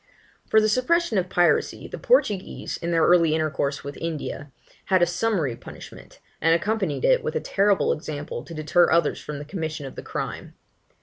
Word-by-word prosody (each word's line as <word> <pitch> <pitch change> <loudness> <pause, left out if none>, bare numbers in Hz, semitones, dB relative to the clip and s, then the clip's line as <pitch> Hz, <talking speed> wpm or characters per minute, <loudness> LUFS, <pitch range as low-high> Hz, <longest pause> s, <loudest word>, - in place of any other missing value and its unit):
For 220 - +5
the 215 - +2
suppression 255 - +2
of 180 0 -3
piracy, 175 -2 +1
the - - -8
Portuguese, 210 - +1
in 170 - -4
their 165 -1 +2
early 170 -3 +4
intercourse 145 -3 -1
with 140 0 -7
India, 150 -3 -5 0.3
had 185 -2 +3
a - - +6
summary 175 - -1
punishment, - - -12 0.2
and 165 +1 +4
accompanied 195 -3 -1
it - - +4
with 470 - -3
a - - +2
terrible 200 0 +2
example 150 -4 -6
to 170 - -10
deter 155 +3 +3
others 170 -3 +2
from 150 - -6
the 145 - -7
commission 160 -3 -5
of 135 - -8
the - - -8
crime. - - -6
170 Hz, 180 wpm, -24 LUFS, 150-205 Hz, 0.3 s, a